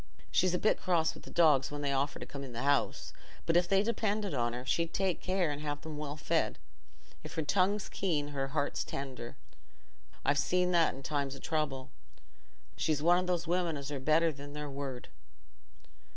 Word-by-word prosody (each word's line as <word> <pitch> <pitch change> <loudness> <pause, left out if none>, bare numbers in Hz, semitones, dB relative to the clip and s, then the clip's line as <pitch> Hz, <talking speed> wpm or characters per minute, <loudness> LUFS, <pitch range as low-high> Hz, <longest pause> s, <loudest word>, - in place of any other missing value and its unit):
She's 185 -1 +3
a - - +2
bit 215 - +2
cross 170 -3 +2
wi' - - -11
the - - -12
dogs 150 -6 +4
when 145 0 -5
they 140 -1 0
offer 140 +2 0
to - - -7
come 140 -1 -7
in 130 -3 -8
th' 120 - -2
house, 140 0 +1 0.3
but 165 - +1
if 175 0 +4
they 195 +2 +4
depended 210 -3 0
on 120 -3 +1
her, 125 +1 -5
she'd 165 +5 0
take 190 -2 0
care 185 -4 +1
and 145 0 -4
have 145 0 -4
'em 155 -1 -5
well 150 0 -4
fed. - - 0 0.7
If - - -8
her 160 - 0
tongue's 195 +5 +2
keen, 155 -7 -1
her 135 -2 -2
heart's 145 +1 -1
tender: 130 -3 -6 0.9
I've 145 0 +3
seen 180 +1 +2
that 170 -2 +3
in 135 - -10
times 140 -1 -1
o' - - -9
trouble. 140 -4 -2 0.8
She's 155 -2 0
one 175 +2 +6
o' - - -5
those 175 -2 0
women 170 -2 0
as 140 +1 -6
are 140 - -2
better 155 +4 +3
than 145 0 -9
their 150 -1 -5
word." 135 -3 -5
150 Hz, 200 wpm, -32 LUFS, 140-175 Hz, 0.9 s, one